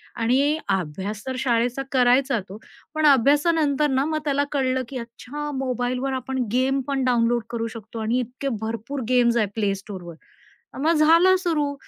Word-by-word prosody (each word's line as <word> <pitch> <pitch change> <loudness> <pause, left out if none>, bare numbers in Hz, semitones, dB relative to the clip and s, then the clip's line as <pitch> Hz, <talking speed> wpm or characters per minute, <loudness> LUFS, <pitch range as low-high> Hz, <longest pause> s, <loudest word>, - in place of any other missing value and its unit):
आणि 270 +6 +2
अभ्यास 195 +3 -3
तर 260 - -2
शाळेचा 245 +1 0
करायचा 255 -1 +3
तो, 200 - -8 0.4
पण 310 0 +1
अभ्यासानंतर 290 +2 +3
ना, 265 +1 +1
मग 310 0 -1
त्याला 285 -1 +1
कळलं 260 -2 0
की 265 - -5
अच्छा 250 +5 -7
मोबाईलवर 255 +1 -2
आपण 260 +1 -4 0.2
गेम 265 +2 +2
पण 275 -2 -1
डाउनलोड 240 -1 +2
करू 230 -1 -2
शकतो. 225 +1 -8
आणि 225 +3 0
इतके 255 +3 -4
भरपूर 230 +5 -4
गेम्स 240 -2 +3
आहेत 210 -4 +1
प्ले 205 -3 +1
स्टोअरवर, 185 -4 -9 0.6
मग 320 +4 +2
झालं 335 +4 +5
सुरु. 305 -6 0
255 Hz, 155 wpm, -23 LUFS, 230-285 Hz, 0.6 s, झालं